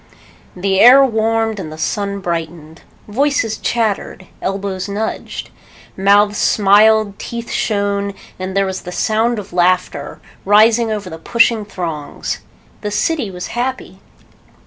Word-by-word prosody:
The 190 +1 0
air 260 +5 +8
warmed 225 -2 0
and 160 -5 -6
the 155 - -9
sun 200 +4 -2
brightened. 165 -2 -5 0.3
Voices 225 -1 0
chattered. 215 -4 -2 0.2
Elbows 195 0 -3
nudged. 210 +2 -4 0.4
Mouths 205 +1 +3
smiled, 210 0 +4
teeth 235 0 -6
shone, 200 -1 -1 0.2
and 185 +1 -4
there 195 - +3
was 190 -1 -4
the 180 - -8
sound 225 +5 0
of 200 -3 -8
laughter, 180 +1 0 0.2
rising 220 +3 +4
over 210 -3 -3
the 165 -2 -8
pushing 230 +2 +2
throngs. 165 -7 -5 0.4
The 210 - -3
city 245 +3 -1
was 180 -1 -7
happy. 245 -6 -4
205 Hz, 125 wpm, -17 LUFS, 190-225 Hz, 0.4 s, air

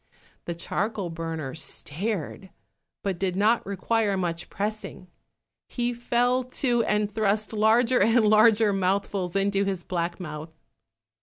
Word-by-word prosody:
The 170 - -4
charcoal 195 +1 -3
burner 165 -4 -4
stared, 185 +4 -3 0.5
but 190 -3 -2
did 185 -2 -1
not 215 +4 +3
require 200 +1 0
much 170 -2 -3
pressing; 210 -2 -4 0.6
he 245 -1 -1
fell 245 +1 +1
to, 245 -1 0
and 210 -1 0
thrust 215 0 0
larger 230 +4 +3
and 225 0 +4
larger 215 0 +5
mouthfuls 195 -1 -1
into 195 0 +2
his 190 -3 -2
black 175 -1 -3
mouth. 155 -1 -8
200 Hz, 125 wpm, -26 LUFS, 180-225 Hz, 0.6 s, larger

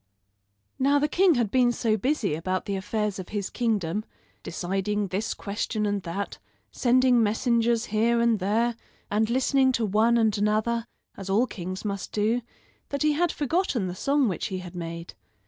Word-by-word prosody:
Now 280 +2 +4
the 290 +1 +2
king 355 +2 +4
had 235 -5 0
been 250 -2 +4
so 230 -2 +1
busy 225 - 0
about 185 +4 -2
the 200 - -2
affairs 205 +1 -2
of 185 - -7
his 205 -2 -3
kingdom 210 -5 -1 0.4
deciding 195 +3 -2
this 200 +5 -2
question 210 +1 -2
and 205 -1 -1
that, 185 +4 -5 0.3
sending 250 -1 +3
messengers 230 +1 +2
here 230 +2 +2
and 235 -2 +3
there, 225 +5 +1 0.4
and 215 +2 +1
listening 260 +1 +3
to 230 -2 +1
one 220 +4 +3
and 220 -2 +2
another, 220 +3 0 0.3
as 195 -1 -8
all 215 +6 +3
kings 185 -3 -6
must 200 -2 -4
do, 220 +3 +1 0.5
that 280 0 -2
he 305 - +4
had 345 +3 +1
forgotten 290 - 0
the 180 - -3
song 275 +7 +1
which 185 -6 -2
he 190 - -4
had 180 -1 -8
made. 170 -1 -6
215 Hz, 170 wpm, -26 LUFS, 195-240 Hz, 0.5 s, Now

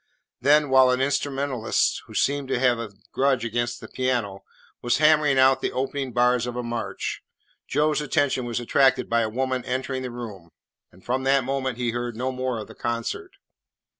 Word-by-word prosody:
Then, 145 +2 +4
while 130 -1 +6
an 125 0 +2
instrumentalist, 135 -3 0
who - - -12
seemed 140 -1 +1
to 130 -1 0
have 125 -2 +2
a 115 -2 -5 0.2
grudge 135 -3 +1
against 120 +1 -2
the - - -9
piano, 120 -7 -2 0.4
was 120 0 +1
hammering 150 -2 +4
out 130 0 +5
the - - -1
opening 135 0 -3
bars 125 0 +2
of 120 - -5
a 125 - -3
march, 120 -1 -4 0.5
Joe's 150 +2 +1
attention 145 -4 0
was 120 0 -2
attracted 130 +1 +3
by 115 0 +3
a 110 - 0
woman 130 +2 -1
entering 130 +1 -3
the 130 - -4
room, 110 -8 -8 0.4
and 90 - -21
from 130 +2 0
that 135 0 +3
moment 130 -1 -2
he 120 -1 -1
heard 120 0 -4
no 130 +3 -2
more 130 -1 -2
of 110 - -6
the - - -12
concert. 120 - -4
130 Hz, 185 wpm, -24 LUFS, 120-135 Hz, 0.5 s, while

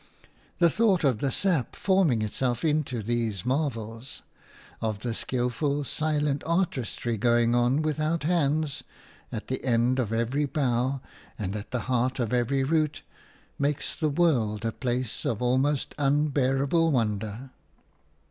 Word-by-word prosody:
The 170 -2 +4
thought 205 -5 +3
of 130 -7 +2
the 140 - 0
sap 165 -4 0
forming 180 - +2
itself 120 +4 -1
into 150 -7 0
these 115 -4 -2
marvels, 125 -4 -3 0.6
of 110 -2 -2
the 120 -1 -2
skilful, 130 +5 -1
silent 150 0 0
artistry 135 - -1
going 120 +1 +3
on 120 +5 +2
without 155 +1 0
hands 155 -3 +1 0.5
at 110 - -5
the 130 - -3
end 125 +1 +2
of 115 -4 -1
every 120 +6 0
bough 130 -1 0 0.4
and 100 -2 -3
at 105 0 -6
the 125 - -2
heart 125 0 0
of 120 -1 -1
every 125 +2 +1
root 150 0 0 0.6
makes 145 0 -1
the 155 - 0
world 125 -10 +1
a 115 - +1
place 125 -1 -2
of 110 - -1
almost 130 +3 +1
unbearable 145 +2 +2
wonder. 110 0 -2
130 Hz, 135 wpm, -27 LUFS, 120-150 Hz, 0.6 s, The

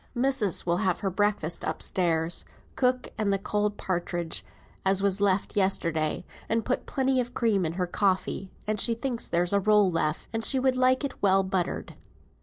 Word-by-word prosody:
"Missis 245 -6 +1
will 170 0 +1
have 185 -1 0
her 195 - -1
breakfast 200 -4 0
up - - -3
stairs, 170 -2 0 0.3
cook, 255 -1 +1
and 210 -2 +1
the 195 - +2
cold 210 +1 -1
partridge 175 -2 -3 0.4
as 195 0 +3
was 200 0 +1
left 200 -1 +1
yesterday, 170 -5 +1 0.2
and 225 0 0
put 255 - -2
plenty 265 -1 +1
of 245 0 -7
cream 205 -7 +1
in 160 - -4
her 180 +1 -1
coffee, 190 +1 -1 0.2
and 215 0 -1
she 230 +2 +3
thinks 240 0 -3
there's 175 +2 +1
a 200 - +4
roll 210 -1 +4
left, 160 -1 -1
and 225 0 -2
she 265 - +4
would 260 0 +2
like 255 +2 +3
it 280 - -5
well 195 -1 +4
buttered." 190 -2 -2
200 Hz, 185 wpm, -27 LUFS, 180-230 Hz, 0.4 s, a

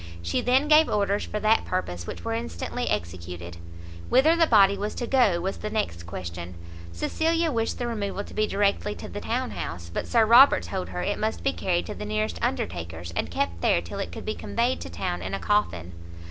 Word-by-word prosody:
She 85 - 0
then 260 +4 +3
gave 310 +1 +6
orders 200 0 +1
for 210 - -3
that 215 +1 +4
purpose, 90 - -3
which 85 0 -7
were 115 - -1
instantly 85 -5 -3
executed. 85 0 -4 0.5
Whither 305 +6 +5
the 335 -1 +4
body 200 -5 +6
was 205 +2 -4
to 240 - -3
go 235 -9 +3
was 190 +3 -3
the 215 - -4
next 85 - -2
question; 85 0 -6 0.4
Cecilia 325 - 0
wished 225 -3 -1
the 245 - -2
removal 205 -4 -3
to - - -12
be 215 0 +1
directly 205 +1 0
to - - -8
the 205 - -6
townhouse, 90 - -3
but - - -3
Sir 230 -2 +4
Robert 235 - +7
told 90 +1 -4
her 90 -1 -4
it - - -1
must 85 0 -2
be 90 - +1
carried 85 0 0
to - - -5
the - - -7
nearest 105 -4 -2
undertaker's, 85 -1 -3
and 85 -2 -2
kept 85 0 -2
there - - +3
till 85 0 -7
it - - -3
could - - -8
be - - -1
conveyed 85 -1 -1
to 90 - -6
town 90 0 -3
in 95 +1 -3
a - - -4
coffin. 90 - 0
105 Hz, 210 wpm, -26 LUFS, -, 0.5 s, Robert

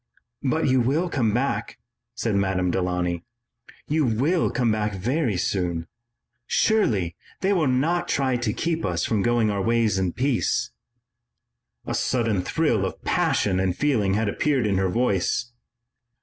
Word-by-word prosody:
"But 150 +3 0
you 130 -1 +3
will 150 +9 +1
come 120 -9 +1
back," 120 -2 -1 0.4
said 115 -2 -1
Madame 95 -2 +1
Delaunay. 90 -1 -1 0.7
"You 155 +1 +1
will 140 +9 +1
come 120 -3 +1
back 105 -1 -1
very 120 - 0
soon. 90 -3 -1 0.6
Surely, 105 - +1 0.3
they 195 +2 +2
will 165 -6 +2
not 150 +8 +1
try 130 -2 +1
to 120 -3 -1
keep 165 +7 -2
us - - -1
from 110 -3 0
going 120 -1 +2
our 100 -1 -1
ways 115 -2 +2
in 95 -2 -1
peace." 130 -2 0 1.1
A - - -3
sudden 115 -6 0
thrill 120 - 0
of 95 - -5
passion 95 -3 +1
and 95 -1 0
feeling 110 -10 +1
had 110 +1 0
appeared 135 +3 +1
in 100 -2 +1
her 95 -1 +1
voice. 120 +2 0
115 Hz, 150 wpm, -24 LUFS, 95-135 Hz, 1.1 s, you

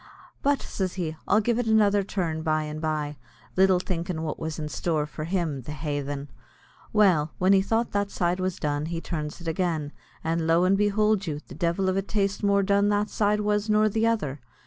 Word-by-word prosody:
"But," 285 0 +1
says 190 -2 -3
he, 165 -4 -3
"I'll 215 - +4
give 235 +2 +1
it 245 - -1
another 205 -2 +4
turn 175 -5 -2
by 155 -1 +1
and 155 0 -5
by," 150 -2 -2 0.4
little 190 0 +5
thinkin' 175 -2 -3
what 155 - -3
was 160 -1 -4
in 155 -1 -3
store 155 -1 -1
for 155 0 -6
him, 165 -6 -1
the 150 +5 -7
haythen. 145 -1 -4 0.6
Well, 180 -8 +3
when 185 +2 +4
he 195 - +5
thought 225 +4 0
that 205 0 0
side 180 -1 0
was 185 -1 -1
done 145 0 -1
he 165 0 -3
turns 155 -3 -4
it 170 - -8
agin, 160 -3 -1 0.3
and 165 0 0
lo 165 +2 +4
and 185 +2 +4
behould 210 -1 +2
you, 150 -2 -2
the - - -10
divil 175 +2 0
a 195 - +2
taste 200 0 -1
more 200 -1 +3
done 200 +1 +3
that 210 +1 +1
side 210 0 +1
was 210 +1 0
nor 215 0 +4
the 225 +2 +1
other. 150 -12 -1
180 Hz, 205 wpm, -26 LUFS, 155-205 Hz, 0.6 s, little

